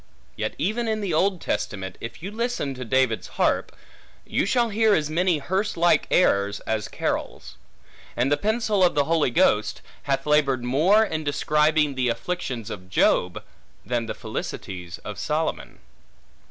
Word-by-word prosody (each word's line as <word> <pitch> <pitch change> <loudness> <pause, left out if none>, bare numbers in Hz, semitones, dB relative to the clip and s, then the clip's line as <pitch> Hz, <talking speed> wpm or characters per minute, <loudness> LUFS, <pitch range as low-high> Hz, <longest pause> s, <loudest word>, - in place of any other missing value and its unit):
Yet - - -3
even 220 +7 -1
in 220 -1 0
the 195 -5 -2
Old 185 +3 +2
Testament, 95 - -3
if 115 +7 -8
you 195 - -5
listen 230 - -2
to 130 -1 -7
David's 130 -2 +1
harp, - - +1 0.5
you - - 0
shall 240 +1 +2
hear 220 0 +3
as 155 -1 -1
many 175 +1 +2
hearse 190 +8 -2
like 170 +1 +3
airs 100 - +2
as 110 -2 -2
carols; - - -4 0.6
and 125 +4 +1
the - - +5
pencil 215 0 +1
of 175 - +3
the 145 - +3
Holy 160 -3 +2
Ghost 110 -2 +2 0.3
hath 135 0 0
labored 140 -4 +2
more 160 - +4
in 160 -7 -3
describing 150 0 +2
the 130 -2 0
afflictions 125 - -3
of 95 -3 -8
Job, 90 -2 +2 0.4
than 120 -2 -1
the - - -4
felicities 90 -3 -6
of - - -6
Solomon. - - -2
150 Hz, 155 wpm, -24 LUFS, 120-190 Hz, 0.6 s, the